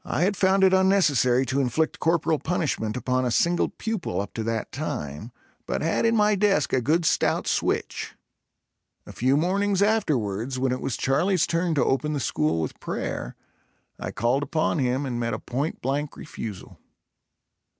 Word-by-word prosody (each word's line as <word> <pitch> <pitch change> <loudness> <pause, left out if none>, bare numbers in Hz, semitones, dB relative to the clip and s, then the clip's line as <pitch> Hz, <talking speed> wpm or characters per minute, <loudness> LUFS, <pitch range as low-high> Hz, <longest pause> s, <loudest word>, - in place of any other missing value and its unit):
I 165 - -1
had 195 +3 +2
found 190 +1 +3
it 190 0 +5
unnecessary 155 - +3
to 135 +2 0
inflict 150 +5 0
corporal 165 -1 +1
punishment 145 -10 -1
upon 130 0 0
a 125 - 0
single 170 +8 +2
pupil 220 -6 -3
up 100 - -4
to 115 - -3
that 115 0 -3
time, 110 - -5 0.4
but - - -2
had 165 +8 +1
in 230 - +2
my 210 -1 +4
desk 195 -6 +2
a 130 - +3
good 160 +7 +1
stout - - +1
switch. - - -1 0.9
A - - -10
few 130 +3 +2
mornings 195 +4 +1
afterwards 130 - 0
when 130 0 0
it 130 - -2
was 130 - -2
Charlie's 175 +6 +2
turn 170 -1 0
to 145 - +2
open 145 +3 0
the 145 - -1
school 80 - 0
with 80 - -5
prayer, - - -4 0.6
I - - -4
called 120 +5 0
upon 155 +2 0
him 130 +2 0
and 120 -3 -3
met 115 -2 -1
a - - -6
point 140 +6 -3
blank 140 +3 -2
refusal. 110 -9 -8
145 Hz, 170 wpm, -25 LUFS, 125-175 Hz, 0.9 s, it